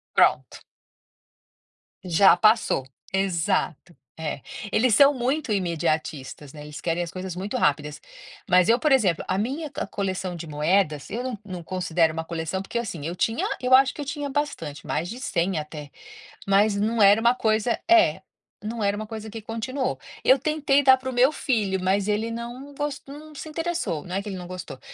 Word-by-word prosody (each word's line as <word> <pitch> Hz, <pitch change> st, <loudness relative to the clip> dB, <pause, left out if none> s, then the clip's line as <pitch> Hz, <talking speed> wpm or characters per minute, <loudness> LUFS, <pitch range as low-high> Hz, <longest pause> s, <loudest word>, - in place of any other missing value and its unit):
Pronto. -, -, +3 dB, 1.5 s
Já, 180 Hz, 0 st, +5 dB
passou. 215 Hz, -, +3 dB, 0.3 s
Exato. 180 Hz, -3 st, -1 dB, 0.2 s
É. 155 Hz, -3 st, -4 dB, 0.3 s
Eles 225 Hz, -2 st, +3 dB
são 280 Hz, 0 st, +7 dB
muito 260 Hz, 0 st, -1 dB
imediatistas, 155 Hz, -6 st, -2 dB
né. 150 Hz, -1 st, -10 dB
Eles 150 Hz, 0 st, -9 dB
querem 170 Hz, +1 st, -1 dB
as 170 Hz, -, -7 dB
coisas 185 Hz, -1 st, -6 dB
muito 195 Hz, +6 st, -4 dB
rápidas. 150 Hz, -3 st, 0 dB, 0.5 s
Mas 180 Hz, 0 st, +5 dB
eu, 235 Hz, +2 st, +5 dB
por 305 Hz, -, +1 dB
exemplo, 205 Hz, -11 st, +3 dB
a 185 Hz, -, 0 dB
minha 275 Hz, +9 st, -2 dB
c 275 Hz, -8 st, -5 dB
coleção 185 Hz, -2 st, -3 dB
de 165 Hz, 0 st, -7 dB
moedas, 150 Hz, 0 st, 0 dB
eu 235 Hz, +3 st, -3 dB
n 250 Hz, -4 st, -4 dB
não 185 Hz, -3 st, -6 dB
considero 170 Hz, -2 st, +1 dB
uma 160 Hz, 0 st, -3 dB
coleção, 165 Hz, +3 st, -3 dB
porque, 235 Hz, +4 st, -3 dB
assim, 175 Hz, -10 st, -5 dB
eu 170 Hz, +2 st, -3 dB
tinha 225 Hz, +5 st, 0 dB, 0.2 s
eu 255 Hz, 0 st, +1 dB
acho 265 Hz, 0 st, +4 dB
que 295 Hz, -, -7 dB
eu -, -, -5 dB
tinha 290 Hz, 0 st, -4 dB
bastante, 270 Hz, -, -3 dB
mais 170 Hz, -, -1 dB
de 240 Hz, -, -7 dB
100 180 Hz, -8 st, -1 dB
até. 150 Hz, -1 st, -8 dB, 0.6 s
Mas, 200 Hz, +1 st, +3 dB
não 220 Hz, +2 st, +1 dB
era 205 Hz, +2 st, +7 dB
uma 235 Hz, +2 st, +4 dB
coisa 220 Hz, 0 st, +1 dB
é, 345 Hz, -1 st, +5 dB, 0.4 s
não 220 Hz, 0 st, -3 dB
era 200 Hz, +1 st, +1 dB
uma 215 Hz, 0 st, -5 dB
coisa 220 Hz, 0 st, -7 dB
que 225 Hz, 0 st, -8 dB
continuou. 240 Hz, +5 st, -3 dB, 0.2 s
Eu 260 Hz, -, +5 dB
tentei 285 Hz, 0 st, +2 dB
dar 265 Hz, -1 st, +8 dB
para 260 Hz, 0 st, -5 dB
o -, -, -7 dB
meu 255 Hz, +4 st, +4 dB
filho, 210 Hz, -10 st, 0 dB
mas 195 Hz, +2 st, +1 dB
ele 215 Hz, +2 st, 0 dB
não 240 Hz, +5 st, -7 dB
gos 290 Hz, -1 st, -3 dB
não 300 Hz, +2 st, -11 dB
se 310 Hz, -, -7 dB
interessou, 325 Hz, -, -2 dB
não 180 Hz, -, -6 dB
é 195 Hz, -, -1 dB
que 210 Hz, -, -8 dB
ele 195 Hz, -, -5 dB
não 180 Hz, -, -7 dB
gostou. 180 Hz, -7 st, -8 dB
205 Hz, 190 wpm, -25 LUFS, 175-255 Hz, 1.5 s, dar